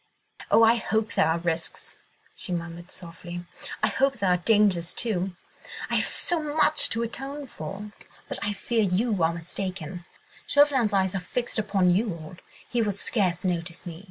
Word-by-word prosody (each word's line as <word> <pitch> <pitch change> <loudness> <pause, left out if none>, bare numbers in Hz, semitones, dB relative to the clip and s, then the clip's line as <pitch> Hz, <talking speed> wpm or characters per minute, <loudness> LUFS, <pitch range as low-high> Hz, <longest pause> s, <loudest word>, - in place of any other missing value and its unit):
"Oh, 225 - +6
I 230 +1 +6
hope 220 -1 0
there - - +4
are 160 +1 +2
risks!" 165 -1 -3 0.4
she - - -6
murmured 170 0 -4
softly. 175 0 -8 0.4
"I - - +6
hope 270 +6 +2
there 195 -4 +2
are 180 - +4
dangers, 185 -3 +3
too!—I 190 -5 -3
have - - +2
so 350 -2 0
much 310 0 +2
to 230 +1 0
atone 270 +5 -5
for. 200 - -7 0.4
But - - -2
I 205 - 0
fear 230 +2 0
you 200 +1 +1
are 160 0 +4
mistaken. 175 0 -4 0.4
Chauvelin's 280 -6 +4
eyes 190 -2 +2
are 195 - 0
fixed 235 +6 -2
upon 195 -4 +3
you 200 +2 +2
all, 160 +2 -10 0.3
he 240 - 0
will 210 -2 +1
scarce 190 -3 0
notice 170 -1 -2
me. 170 -2 -7
195 Hz, 165 wpm, -27 LUFS, 175-225 Hz, 0.4 s, Oh